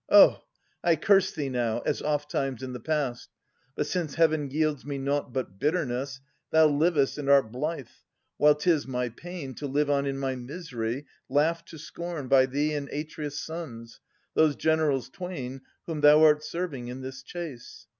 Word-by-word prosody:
Oh! -, -, +7 dB, 0.4 s
I 170 Hz, -1 st, +4 dB
curse 195 Hz, +4 st, +4 dB
thee 145 Hz, -3 st, -3 dB
now, 120 Hz, -2 st, -1 dB
as 150 Hz, -, -1 dB
ofttimes 145 Hz, -3 st, -1 dB
in 130 Hz, -1 st, -5 dB
the 125 Hz, -, -5 dB
past: 140 Hz, -3 st, -2 dB, 0.5 s
But 150 Hz, -, 0 dB
since 155 Hz, -2 st, -2 dB
Heaven 155 Hz, -3 st, +2 dB
yields 150 Hz, 0 st, 0 dB
me 145 Hz, 0 st, -4 dB
nought 140 Hz, 0 st, -1 dB
but 120 Hz, -7 st, -4 dB
bitterness. 135 Hz, -4 st, -1 dB, 0.3 s
Thou 160 Hz, 0 st, +6 dB
livest 150 Hz, -1 st, +2 dB
and 140 Hz, -1 st, -2 dB
art 140 Hz, -6 st, +5 dB
blithe, 140 Hz, +3 st, -3 dB, 0.5 s
while 150 Hz, 0 st, +6 dB
'tis 155 Hz, -1 st, +1 dB
my 125 Hz, -1 st, -1 dB
pain 165 Hz, +1 st, -8 dB
To 145 Hz, +4 st, -5 dB
live 145 Hz, +1 st, +1 dB
on 140 Hz, 0 st, +1 dB
in 135 Hz, 0 st, -2 dB
my 135 Hz, -1 st, -1 dB
misery, 125 Hz, -2 st, -5 dB, 0.2 s
laughed 165 Hz, +3 st, +1 dB
to 160 Hz, -, -10 dB
scorn 165 Hz, -1 st, -6 dB
By 130 Hz, 0 st, +5 dB
thee 145 Hz, +3 st, 0 dB
and 145 Hz, -2 st, -3 dB
Atreus' 150 Hz, -1 st, -5 dB
sons, 120 Hz, -9 st, -7 dB, 0.3 s
those 155 Hz, -2 st, +4 dB
generals 155 Hz, -5 st, +1 dB
twain 150 Hz, -9 st, -6 dB, 0.2 s
Whom 160 Hz, -3 st, -4 dB
thou 150 Hz, +1 st, +7 dB
art 150 Hz, -1 st, +5 dB
serving 155 Hz, -6 st, -4 dB
in 125 Hz, +2 st, -6 dB
this 130 Hz, 0 st, -7 dB
chase. 150 Hz, -5 st, -8 dB
145 Hz, 170 wpm, -27 LUFS, 130-160 Hz, 0.5 s, Oh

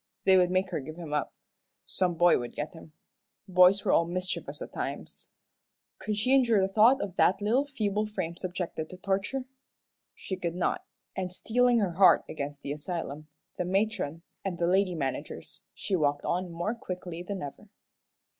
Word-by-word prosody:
They 190 Hz, -, +6 dB
would 180 Hz, -1 st, +5 dB
make 185 Hz, +1 st, 0 dB
her 175 Hz, -, -1 dB
give 155 Hz, +3 st, -8 dB
him 165 Hz, -3 st, -7 dB
up. 150 Hz, -, -1 dB, 0.5 s
Some 180 Hz, -2 st, 0 dB
boy 175 Hz, +1 st, +5 dB
would 120 Hz, -1 st, -6 dB
get 150 Hz, +1 st, -4 dB
him. 160 Hz, -2 st, -13 dB, 0.5 s
Boys 185 Hz, +2 st, +5 dB
were -, -, +3 dB
all 170 Hz, -, +4 dB
mischievous 185 Hz, +1 st, -3 dB
at -, -, -8 dB
times. -, -, -6 dB, 0.7 s
Could 215 Hz, -1 st, -2 dB
she 250 Hz, +5 st, +2 dB
endure 240 Hz, -6 st, +5 dB
the 190 Hz, -, +3 dB
thought 230 Hz, +6 st, +6 dB
of 190 Hz, -3 st, -5 dB
that 190 Hz, -, +4 dB
little 240 Hz, +8 st, +1 dB
feeble 215 Hz, -6 st, -1 dB
frame 170 Hz, -5 st, -4 dB
subjected 180 Hz, -3 st, -4 dB
to 185 Hz, -, -10 dB
torture? 195 Hz, +8 st, -1 dB, 0.7 s
She 190 Hz, -, -5 dB
could 170 Hz, -2 st, -3 dB
not, 180 Hz, -, 0 dB, 0.3 s
and 185 Hz, -1 st, -3 dB
steeling 245 Hz, +5 st, +2 dB
her 200 Hz, -5 st, +1 dB
heart 185 Hz, +2 st, +6 dB
against 145 Hz, -1 st, -6 dB
the 140 Hz, -, -4 dB
asylum, 150 Hz, -1 st, -5 dB, 0.3 s
the -, -, +2 dB
matron, 185 Hz, -5 st, -1 dB, 0.2 s
and 190 Hz, -3 st, -3 dB
the 170 Hz, -, +1 dB
lady 185 Hz, 0 st, +2 dB
managers, 135 Hz, -4 st, -5 dB
she 200 Hz, -, -2 dB
walked 145 Hz, -4 st, +1 dB
on 180 Hz, +1 st, -1 dB
more 175 Hz, +6 st, -2 dB
quickly 180 Hz, -6 st, -6 dB
than 190 Hz, 0 st, -5 dB
ever. 140 Hz, -, -9 dB
185 Hz, 175 wpm, -29 LUFS, 170-205 Hz, 0.7 s, They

